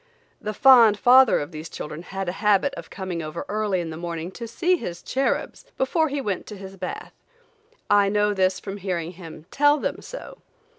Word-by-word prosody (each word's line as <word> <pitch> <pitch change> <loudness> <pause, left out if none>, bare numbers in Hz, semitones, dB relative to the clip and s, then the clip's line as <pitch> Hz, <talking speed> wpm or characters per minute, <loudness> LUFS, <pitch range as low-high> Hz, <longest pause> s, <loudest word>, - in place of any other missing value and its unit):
The 215 0 -4
fond 235 -5 +7
father 255 +3 +6
of 145 +3 -5
these 155 +1 -8
children 150 +2 -7
had 190 +1 -5
a - - 0
habit 210 +6 +3
of - - -9
coming 185 -3 -5
over 155 +1 -6
early 210 -3 -1
in 165 -1 -5
the 160 - -7
morning 170 0 -5
to 235 +3 -7
see 350 +11 +1
his 175 - -6
cherubs, 270 - -2
before 315 +4 +1
he 285 +1 -2
went 205 -8 -3
to 210 - -8
his 195 0 -10
bath. 190 - -6 0.7
I 205 -1 +4
know 210 0 +2
this 185 -1 +1
from 195 0 -7
hearing 175 -4 -3
him 165 -3 -11
tell 290 +1 +4
them - - -3
so. - - -9
200 Hz, 195 wpm, -24 LUFS, 175-245 Hz, 0.7 s, fond